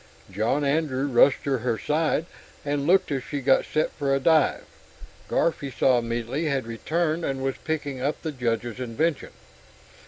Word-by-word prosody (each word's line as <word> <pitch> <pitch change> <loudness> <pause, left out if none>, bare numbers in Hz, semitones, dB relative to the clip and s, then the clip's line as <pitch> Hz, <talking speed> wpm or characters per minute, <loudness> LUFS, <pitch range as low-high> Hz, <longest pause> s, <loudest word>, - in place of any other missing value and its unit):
John 110 +9 0
Andrew 140 -2 0
rushed 135 0 +4
to 135 -3 0
her 120 -1 -1
side 155 +3 0 0.4
and 145 0 -1
looked 185 -2 +3
as 135 -3 -1
she 145 - -4
got 135 0 +3
set 155 - 0
for 140 -1 0
a - - +1
dive. 155 +1 +3 0.7
Garf, 170 - +1
he 140 - -4
saw 130 0 +3
immediately, 120 +6 -3
had 140 -4 0
returned, 155 +8 -1
and 135 -2 -2
was 135 0 -1
picking 145 -4 -3
up 145 +3 -1
the 160 - -2
Judge's 120 -3 -2
invention. 135 +5 -1
140 Hz, 165 wpm, -25 LUFS, 125-155 Hz, 0.7 s, rushed